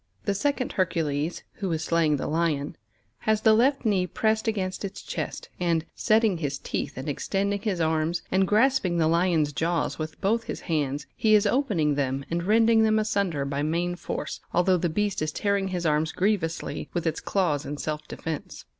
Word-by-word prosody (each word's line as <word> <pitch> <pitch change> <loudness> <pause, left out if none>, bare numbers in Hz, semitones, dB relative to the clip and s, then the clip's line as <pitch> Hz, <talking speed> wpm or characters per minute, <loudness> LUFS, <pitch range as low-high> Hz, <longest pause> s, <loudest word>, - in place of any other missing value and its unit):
The 200 - +1
second 260 +5 -1
Hercules, 165 -3 -1
who 195 -4 -2
is 160 -1 -1
slaying 160 -3 +2
the - - -4
Lion, 155 -3 0 0.4
has 220 -1 +1
the 220 0 +6
left 260 +4 +3
knee 190 -4 +2
pressed 220 +3 0
against 190 -4 -2
its 195 - -6
chest, - - -5
and, 165 -2 +1
setting 215 -5 +2
his 145 -3 -2
teeth - - -4
and 130 +3 -5
extending 200 +7 -1
his 200 -5 -1
arms, 160 +1 0
and 190 0 +3
grasping 215 -4 +3
the 160 -2 +3
Lion's 165 -3 +2
jaws 165 +3 -1
with 155 -1 -5
both 225 +3 +1
his - - -5
hands, 145 -3 -1
he 215 -1 +4
is 210 0 +4
opening 205 - +2
them 135 -1 -1
and 170 +1 -1
rending 225 +1 +5
them 220 0 +3
asunder 200 -9 0
by 140 +1 -2
main 170 +4 0
force, - - -5 0.2
although 180 +1 +4
the 175 0 0
beast 205 +3 -1
is 155 0 -1
tearing 200 +2 0
his 180 -2 -3
arms 155 0 +1
grievously 180 -4 -1
with 175 -1 -1
its 160 -1 0
claws 165 -8 0
in 145 - -5
self 150 0 -4
defence. 160 -3 -6
175 Hz, 185 wpm, -26 LUFS, 155-205 Hz, 0.4 s, the